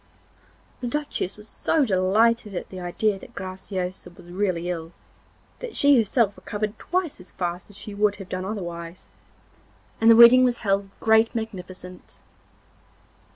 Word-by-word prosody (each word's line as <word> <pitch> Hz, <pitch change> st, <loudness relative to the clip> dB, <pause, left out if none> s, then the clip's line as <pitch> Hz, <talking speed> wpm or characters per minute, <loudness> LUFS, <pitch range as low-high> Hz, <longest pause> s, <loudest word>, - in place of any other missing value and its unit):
The 245 Hz, -, -4 dB
Duchess 280 Hz, -8 st, -3 dB
was 210 Hz, +1 st, -12 dB
so 305 Hz, +6 st, +1 dB
delighted 210 Hz, +2 st, +2 dB
at -, -, -5 dB
the 185 Hz, -, -8 dB
idea 195 Hz, +3 st, -1 dB
that 240 Hz, -, -14 dB
Graciosa 185 Hz, -1 st, -5 dB
was 175 Hz, -, -16 dB
really 180 Hz, -2 st, -1 dB
ill, 165 Hz, -1 st, -4 dB, 0.7 s
that -, -, -7 dB
she 285 Hz, 0 st, +5 dB
herself 225 Hz, -2 st, +2 dB
recovered 210 Hz, 0 st, -4 dB
twice 355 Hz, -, -2 dB
as 180 Hz, -, -14 dB
fast 175 Hz, +1 st, -4 dB
as 205 Hz, -, -12 dB
she 210 Hz, -, -7 dB
would 205 Hz, 0 st, +2 dB
have 195 Hz, -3 st, -10 dB
done 185 Hz, 0 st, -3 dB
otherwise, 175 Hz, -4 st, -6 dB, 0.9 s
and 225 Hz, -, +6 dB
the 230 Hz, -, +9 dB
wedding 235 Hz, +2 st, +9 dB
was 245 Hz, -1 st, +2 dB
held 195 Hz, 0 st, +2 dB
with 195 Hz, -, -25 dB
great 220 Hz, +1 st, +3 dB
magnificence. 185 Hz, -4 st, -7 dB
200 Hz, 155 wpm, -24 LUFS, 185-230 Hz, 0.9 s, the